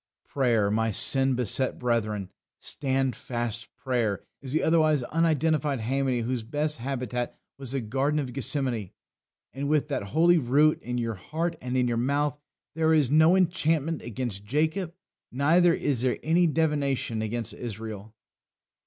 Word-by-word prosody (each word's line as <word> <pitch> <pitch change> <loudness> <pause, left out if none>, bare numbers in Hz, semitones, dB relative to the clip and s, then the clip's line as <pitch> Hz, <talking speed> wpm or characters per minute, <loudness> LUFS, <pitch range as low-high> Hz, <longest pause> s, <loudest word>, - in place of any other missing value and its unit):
Prayer, 115 -7 +1
my 115 +1 +1
sin 135 +5 +4
beset 125 +2 +1
brethren, 110 -5 -1 0.3
standfast 125 -4 -2
prayer, 120 -7 -1 0.2
is 135 -2 -6
the 155 - +1
otherwise 155 -4 +3
unidentified 155 -1 +1
haemony 130 +1 0
whose 125 +1 -2
best 150 +5 -2
habitat 125 -2 -3 0.2
was 135 -2 -6
the 135 - -1
Garden 135 +7 0
of 130 -4 -4
Gethsemane; 130 - -1 0.6
and 140 +1 -3
with 150 0 +1
that 140 - -1
holy 165 - +4
root 145 +4 +3
in 125 +1 -4
your 115 -1 -1
heart 165 - -3
and 125 +1 -2
in 125 -1 +2
your 120 -1 0
mouth, 145 +4 0 0.3
there 160 0 +2
is 145 -4 +2
"no 160 +4 +5
enchantment 165 -3 +1
against 115 -4 -5
Jacob, 155 - -1 0.4
neither 165 +7 +4
is 140 -7 0
there 130 -1 +1
any 170 +3 +3
divination 145 -7 0
against 115 +1 -3
Israel." 110 -2 -7
135 Hz, 145 wpm, -27 LUFS, 120-155 Hz, 0.6 s, no